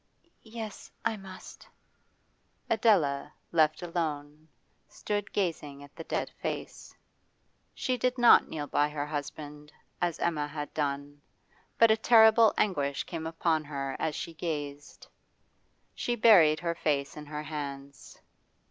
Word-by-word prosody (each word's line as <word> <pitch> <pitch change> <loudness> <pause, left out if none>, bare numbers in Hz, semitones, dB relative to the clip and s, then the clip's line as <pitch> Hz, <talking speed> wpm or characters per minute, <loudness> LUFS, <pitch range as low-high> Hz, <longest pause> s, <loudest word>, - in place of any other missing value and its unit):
'Yes, 220 -2 -8 0.2
I 220 - +1
must.' 190 -2 -12 1.0
Adela, 165 -11 +2 0.2
left 155 0 +2
alone, 155 -3 -4 0.4
stood 205 +6 -4
gazing 150 -7 -3
at 145 - -16
the 165 - -7
dead - - -2
face. - - -6 0.8
She 255 -1 -1
did 250 +2 0
not 240 -1 +7
kneel 150 -2 -4
by 145 +1 +1
her 145 -1 -3
husband, 150 0 -7 0.3
as 175 -2 0
Emma 155 -4 -1
had 150 0 -6
done, 145 -1 -3 0.6
but 230 -1 +6
a 220 - +4
terrible 220 -1 +6
anguish 145 -9 0
came 160 -2 -5
upon 160 -1 0
her 135 -2 -4
as 155 -2 -1
she 165 - -5
gazed; 145 -3 -6 0.9
she 240 - -2
buried 185 -10 +6
her 170 -1 -1
face 145 -4 -1
in 150 -1 -9
her 150 0 -5
hands. 140 -3 -7
155 Hz, 130 wpm, -29 LUFS, 145-190 Hz, 1.0 s, not